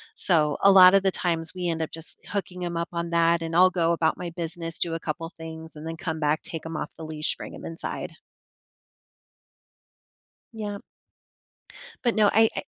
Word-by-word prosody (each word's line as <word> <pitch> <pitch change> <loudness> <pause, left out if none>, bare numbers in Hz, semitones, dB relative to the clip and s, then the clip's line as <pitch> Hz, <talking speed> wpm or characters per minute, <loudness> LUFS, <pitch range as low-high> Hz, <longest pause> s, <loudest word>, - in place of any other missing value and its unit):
so, 155 - +2
a 200 - +8
lot 185 0 +9
of 195 - +4
the 190 - +3
times, 165 -3 -1
we 180 -1 -2
end 165 -1 -2
up 160 - -3
just 165 0 -7
hooking 185 -3 -4
him 175 -1 -3
up 170 0 -2
on 170 0 -3
that, 170 0 +3
and 165 0 -3
I'll 185 +2 +7
go 170 -2 +1
about 160 -1 +1
my 175 -1 -5
business, 165 -1 -5
do 170 -2 -1
a - - -3
couple 165 +1 -4
things, 160 -1 -9
and 155 +2 -7
then 165 - -4
come 160 -2 -4
back, 150 0 +1
take 165 -1 -6
him 165 0 -5
off - - -4
the 160 - -7
leash, 155 -1 -2
bring - - -8
him - - -10
inside. 165 0 -5 2.4
Yep. 205 -2 -5 1.2
But 240 - +3
no, 210 -2 +4
I 225 +1 +5
I - - -1
170 Hz, 200 wpm, -26 LUFS, 160-180 Hz, 2.4 s, lot